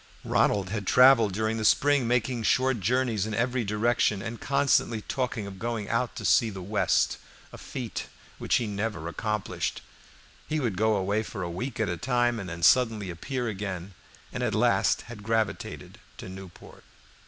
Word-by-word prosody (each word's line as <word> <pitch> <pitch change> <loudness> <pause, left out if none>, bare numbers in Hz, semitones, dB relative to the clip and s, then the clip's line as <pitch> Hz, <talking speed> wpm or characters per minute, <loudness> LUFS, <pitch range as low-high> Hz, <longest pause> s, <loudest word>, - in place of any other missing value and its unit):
Ronald 100 -3 +2
had 105 -3 -3
traveled 125 -5 +6
during 110 +3 -1
the 110 - -3
spring, 140 +3 +3
making 125 0 0
short 130 +2 +2
journeys 115 -1 0
in 110 - -3
every 125 +1 0
direction, 105 0 +1
and 115 +3 -6
constantly 140 -5 +2
talking 125 -5 -2
of 95 -1 -9
going 115 -2 -3
out 115 +2 -1
to 105 - -6
see 90 +7 +4
the 95 -2 -7
West, 105 +2 +1 0.3
a - - -8
feat 125 -4 -5 0.3
which - - +1
he 120 - +1
never 105 -5 -3
accomplished. 105 +4 -3 0.6
He 155 - -1
would 120 -9 -1
go 110 +3 +2
away 100 +2 0
for 105 -3 -6
a 85 - -4
week 120 +8 -5
at - - +1
a - - -2
time 120 -2 +1
and 95 -2 -6
then 85 0 -7
suddenly 110 -3 +3
appear 125 +9 -4
again, 95 -3 -5 0.4
and - - -4
at - - 0
last - - +2
had 115 -3 -10
gravitated 110 0 -2 0.2
to - - -8
Newport. 95 -1 -12
110 Hz, 175 wpm, -27 LUFS, 100-120 Hz, 0.6 s, traveled